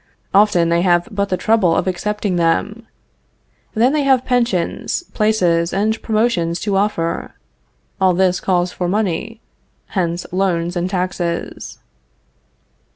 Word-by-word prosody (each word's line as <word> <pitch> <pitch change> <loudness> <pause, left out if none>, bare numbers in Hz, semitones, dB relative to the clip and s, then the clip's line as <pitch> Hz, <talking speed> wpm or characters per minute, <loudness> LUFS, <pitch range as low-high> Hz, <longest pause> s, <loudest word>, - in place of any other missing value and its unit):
Often 195 -4 +4
they 170 0 +2
have 175 -1 +2
but 200 -1 -1
the 185 - 0
trouble 185 -3 +2
of - - 0
accepting 195 +1 -2
them. 205 +7 0 0.9
Then 240 +5 +3
they 305 - +2
have 265 -2 +2
pensions, 240 - 0
places, 180 -6 +1
and 215 +3 0
promotions 215 -7 0
to 205 -1 -1
offer. 195 -4 -1 0.7
All 185 -2 +4
this 185 0 +2
calls 180 -1 0
for 180 - -3
money. 210 +3 -2 0.5
Hence 175 -2 -2
loans 175 -2 0
and 175 +1 -1
taxes. 180 -2 -3
185 Hz, 125 wpm, -18 LUFS, 175-215 Hz, 0.9 s, Often